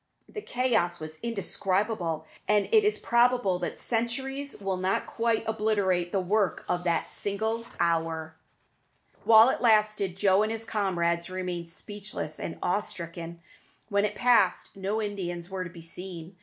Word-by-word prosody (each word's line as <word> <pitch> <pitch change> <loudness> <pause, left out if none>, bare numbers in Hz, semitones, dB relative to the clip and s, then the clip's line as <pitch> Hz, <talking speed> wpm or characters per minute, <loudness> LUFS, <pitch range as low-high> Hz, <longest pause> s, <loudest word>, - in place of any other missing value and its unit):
The 420 - -7
chaos 240 - 0
was 155 0 -8
indescribable, 195 -6 -1 0.2
and 210 -1 +3
it 440 -2 +6
is 420 +1 +2
probable 235 -6 +3
that - - -3
centuries 265 +4 -2
will 195 -2 -2
not 185 +1 0
quite 230 -1 0
obliterate 205 -5 +1
the 195 - +1
work 195 +2 0
of 175 0 -1
that 170 -1 +1
single 220 +3 -2
hour. 165 -1 0 0.9
While 225 +2 +8
it - - -1
lasted, 215 -5 +3
Joe 195 0 +4
and 215 +1 +1
his 225 0 -3
comrades 170 -5 0
remained 180 -2 -4
speechless 200 -4 -6
and 165 - -5
awe 180 - +2
stricken. 170 -3 -7 0.5
When 200 -1 +2
it 210 0 -1
passed, 245 0 +3
no 195 +3 -2
Indians 180 -3 -4
were 190 -1 -2
to 180 - -7
be 170 -1 -12
seen. 175 +1 -7
195 Hz, 150 wpm, -28 LUFS, 175-220 Hz, 0.9 s, While